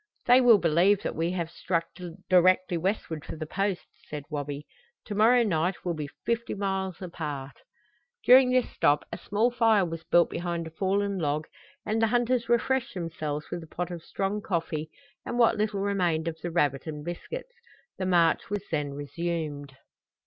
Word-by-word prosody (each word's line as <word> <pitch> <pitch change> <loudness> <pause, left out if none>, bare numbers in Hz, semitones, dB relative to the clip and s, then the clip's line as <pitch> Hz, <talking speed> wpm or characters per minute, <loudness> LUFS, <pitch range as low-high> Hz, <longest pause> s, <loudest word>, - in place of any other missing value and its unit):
"They 250 +1 +7
will 240 -3 +7
believe 175 +3 +3
that - - -3
we 165 +2 0
have 170 -3 -3
struck 170 -1 -1 0.4
directly 185 0 +4
westward 165 -3 -2
for - - -7
the 155 0 -5
Post," 195 +2 -2 0.2
said 150 -1 -5
Wabi. 145 0 -4 0.4
"To 210 - -5
morrow 235 +4 +5
night 175 -3 -1
we'll 175 - 0
be 150 -3 -5 0.2
fifty 235 0 -1
miles 190 -2 -2
apart." 145 -6 -6 0.7
During 255 +1 +7
this 255 -1 +2
stop 145 +1 +2
a - - -4
small 220 +4 +1
fire 225 -5 +3
was 165 -1 -6
built 175 0 +3
behind 170 -1 -3
a 160 - -8
fallen 195 +3 0
log 150 -1 -1 0.4
and 220 +1 0
the 225 - +4
hunters 240 +1 +1
refreshed 240 0 +1
themselves 155 -4 -4
with 175 - -3
a 160 - -11
pot 175 +2 -4
of 170 -1 -6
strong 195 +5 -2
coffee 165 -5 -2 0.3
and - - -4
what 235 -2 +4
little 210 -2 0
remained 180 -5 0
of 165 - -2
the 175 - -3
rabbit 145 -4 0
and 150 -1 -6
biscuits. - - -6 0.5
The 185 - -1
march 170 -1 +3
was 205 -1 -2
then 145 -3 -1
resumed. 145 -2 -4
175 Hz, 175 wpm, -27 LUFS, 160-205 Hz, 0.7 s, They